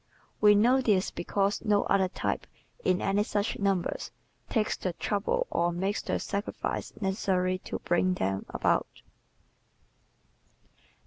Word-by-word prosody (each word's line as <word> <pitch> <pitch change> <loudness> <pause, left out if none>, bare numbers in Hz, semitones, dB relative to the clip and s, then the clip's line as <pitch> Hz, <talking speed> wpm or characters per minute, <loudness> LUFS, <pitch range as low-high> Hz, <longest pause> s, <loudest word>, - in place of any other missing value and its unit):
We 210 -1 +7
know 245 +6 +4
this 200 -6 +2
because 200 +3 -1
no 205 -2 +3
other 195 -1 +2
type, 180 - -3 0.4
in 185 - +2
any 195 +1 +2
such 205 0 -1
numbers, 195 -3 0 0.4
takes 220 -3 +1
the 180 - -3
trouble 215 - -1
or 170 0 +1
makes 190 +4 -1
the - - -1
sacrifices 200 +1 -4
necessary 190 -2 0
to - - -3
bring 180 +1 +1
them 95 - -2
about. - - 0
195 Hz, 125 wpm, -29 LUFS, 185-210 Hz, 0.4 s, We